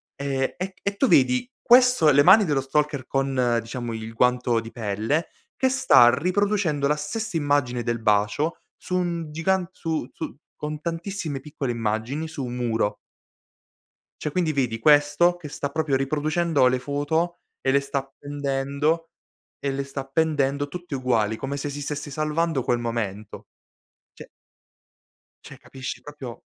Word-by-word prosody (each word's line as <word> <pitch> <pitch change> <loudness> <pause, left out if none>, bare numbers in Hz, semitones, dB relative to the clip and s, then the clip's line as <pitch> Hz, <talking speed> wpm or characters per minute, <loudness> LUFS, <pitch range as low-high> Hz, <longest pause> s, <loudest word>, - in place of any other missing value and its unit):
e 135 -1 -2
e 185 +1 -4
e 200 0 -1
tu 270 - +3
vedi 130 - +3
questo: 250 -10 +6
le 145 +1 +6
mani 200 +3 +7
dello 145 -4 +1
stalker 145 -1 -1
con, 130 -3 +1
diciamo, 115 +1 -5
il 110 0 -6
guanto 125 0 +2
di 115 0 -7
pelle 110 +8 -1 0.3
che 260 - +2
sta 120 - +6
riproducendo 180 -4 +1
la 150 - +2
stessa 195 +5 -3
immagine 145 -5 +1
del 120 -1 -2
bacio 105 +10 +1 0.2
su 180 - -3
un 170 -3 -2
gigant 180 +3 0
su 160 -6 -3
su - - -6 0.2
con 150 0 -4
tantissime 165 -4 -4
piccole 145 -4 -4
immagini 115 +7 -2
su 150 -5 -5
un 120 0 -5
muro. 115 -4 0 1.3
Cioè 150 - -2
quindi 170 -3 0
vedi 125 -5 -1
questo 150 +5 +4
che 160 -4 -9
sta 140 0 -4
proprio 155 -2 0
riproducendo 150 +1 +1
le 125 0 +1
foto 145 +6 -1 0.2
e 135 - +1
le 140 - +4
sta 140 0 -2
appendendo 140 +3 -2 0.5
e 140 - -1
le 135 0 -2
sta 135 0 -5
appendendo 145 0 0
tutte 175 -1 -6
uguali, 115 -4 +1
come 140 +1 -4
se 145 +1 -3
si 145 +1 -6
stesse 145 +1 -4
salvando 155 -1 0
quel 120 - +1
momento. 110 -3 -4 0.7
Cioè - - -12 1.2
cioè - - -11
capisci 130 -2 -7
proprio 135 -4 -9
145 Hz, 150 wpm, -24 LUFS, 125-160 Hz, 1.3 s, mani